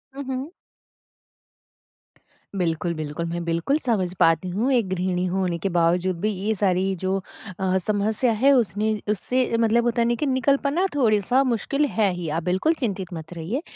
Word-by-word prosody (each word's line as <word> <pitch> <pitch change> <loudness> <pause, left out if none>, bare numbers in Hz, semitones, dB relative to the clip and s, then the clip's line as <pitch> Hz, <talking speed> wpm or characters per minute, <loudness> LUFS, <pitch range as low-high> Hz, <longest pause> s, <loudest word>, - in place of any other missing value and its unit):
हुँ, 280 - -5
हुँ। 265 +5 -4 2.1
बिल्कुल, 170 0 -1
बिल्कुल, 155 +1 -4
मैं 170 +1 -3
बिल्कुल 170 - +1
समझ 190 -7 0
पाती 165 +3 +3
हूँ 225 +9 0
एक 235 -6 +2
गृहिणी 180 0 -1
होने 180 -1 -1
के 195 +4 -2
बावजूद 175 +1 +2
भी 215 - +1
ये 205 +3 -1
सारी 190 -1 +1
जो 190 +1 +1 0.4
अ, 190 0 +1
समस्या 215 +4 +1
है 275 +2 +5
उसने 215 -3 +1 0.2
उससे 250 +4 0
मतलब 230 +1 +3
होता 240 0 +1
है 230 - +2
ना 240 - +2
कि 300 - 0
निकल 275 +1 +2
पाना 320 +7 +1
थोडे-सा 240 +1 +3
मुश्किल 270 +4 0
है 215 -7 +1
ही, 175 -2 -5
आप 160 +2 -2
बिल्कुल 190 - +1
चिंतित 190 -7 -3
मत 160 +1 -8
रहिए। 180 - -3
200 Hz, 170 wpm, -23 LUFS, 180-245 Hz, 2.1 s, है